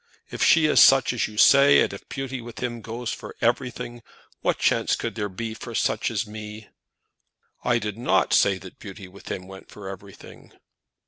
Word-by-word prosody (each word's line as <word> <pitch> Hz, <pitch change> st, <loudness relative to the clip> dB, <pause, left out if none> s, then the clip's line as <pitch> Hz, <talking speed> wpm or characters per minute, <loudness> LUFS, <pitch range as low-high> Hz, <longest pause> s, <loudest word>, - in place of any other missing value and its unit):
If -, -, -2 dB
she 160 Hz, -2 st, +5 dB
is 150 Hz, -, +4 dB
such 135 Hz, -2 st, +6 dB
as 120 Hz, -, -1 dB
you 105 Hz, -, -12 dB
say, 140 Hz, +4 st, +6 dB
and -, -, 0 dB
if -, -, -11 dB
beauty 135 Hz, -2 st, -5 dB
with 115 Hz, -1 st, -11 dB
him 120 Hz, -2 st, -4 dB
goes 115 Hz, +1 st, -5 dB
for -, -, -9 dB
everything, 120 Hz, 0 st, -2 dB, 0.4 s
what -, -, 0 dB
chance -, -, +1 dB
could -, -, -4 dB
there 105 Hz, 0 st, -3 dB
be 110 Hz, +4 st, -5 dB
for 115 Hz, +1 st, -9 dB
such 110 Hz, 0 st, 0 dB
as 110 Hz, -1 st, -2 dB
me?" 105 Hz, 0 st, -9 dB, 0.9 s
"I 120 Hz, -1 st, +2 dB
did 105 Hz, -1 st, -5 dB
not 120 Hz, -, +1 dB
say 100 Hz, -1 st, +4 dB
that 95 Hz, -1 st, -13 dB
beauty 100 Hz, -2 st, -10 dB
with 95 Hz, +2 st, -13 dB
him 90 Hz, -1 st, -5 dB
went 95 Hz, 0 st, -12 dB
for 100 Hz, -2 st, -10 dB
everything." 95 Hz, 0 st, -12 dB
110 Hz, 190 wpm, -24 LUFS, 100-120 Hz, 0.9 s, such